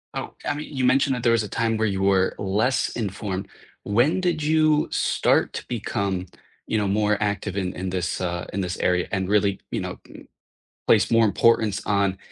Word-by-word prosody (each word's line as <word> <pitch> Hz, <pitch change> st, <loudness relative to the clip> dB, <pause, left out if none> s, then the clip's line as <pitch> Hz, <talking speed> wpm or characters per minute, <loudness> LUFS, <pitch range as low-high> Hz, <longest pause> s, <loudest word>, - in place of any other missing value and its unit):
Oh, -, -, -5 dB
I 145 Hz, -, 0 dB
mean, 150 Hz, +1 st, -7 dB
you 130 Hz, -1 st, 0 dB
mentioned 135 Hz, +1 st, +3 dB
that 120 Hz, -, -5 dB
there 115 Hz, -, +4 dB
was 115 Hz, -, +3 dB
a 105 Hz, -, -6 dB
time 115 Hz, -1 st, 0 dB
where 110 Hz, 0 st, +1 dB
you 95 Hz, -1 st, -2 dB
were 95 Hz, -1 st, +2 dB
less 105 Hz, +7 st, 0 dB
informed. 100 Hz, -3 st, -4 dB, 0.4 s
When 120 Hz, -, +2 dB
did 170 Hz, -4 st, 0 dB
you 155 Hz, 0 st, +3 dB
start -, -, +1 dB
to -, -, -6 dB
become, 95 Hz, -2 st, -2 dB, 0.4 s
you 110 Hz, -, 0 dB
know, 105 Hz, -2 st, 0 dB
more 105 Hz, +1 st, +1 dB
active 100 Hz, -1 st, -2 dB
in 95 Hz, -2 st, -2 dB
in 95 Hz, +1 st, -4 dB
this, 90 Hz, -3 st, -2 dB
uh 85 Hz, -1 st, -2 dB
in 100 Hz, -, -1 dB
this 90 Hz, -1 st, -3 dB
area 90 Hz, 0 st, +1 dB
and 95 Hz, -2 st, -1 dB
really, 100 Hz, -1 st, +2 dB
you -, -, -2 dB
know, -, -, -6 dB
m -, -, -12 dB, 0.7 s
place 110 Hz, +1 st, +4 dB
more 115 Hz, 0 st, +5 dB
importance 110 Hz, 0 st, +3 dB
on 100 Hz, -2 st, +1 dB
105 Hz, 200 wpm, -24 LUFS, 95-115 Hz, 0.7 s, more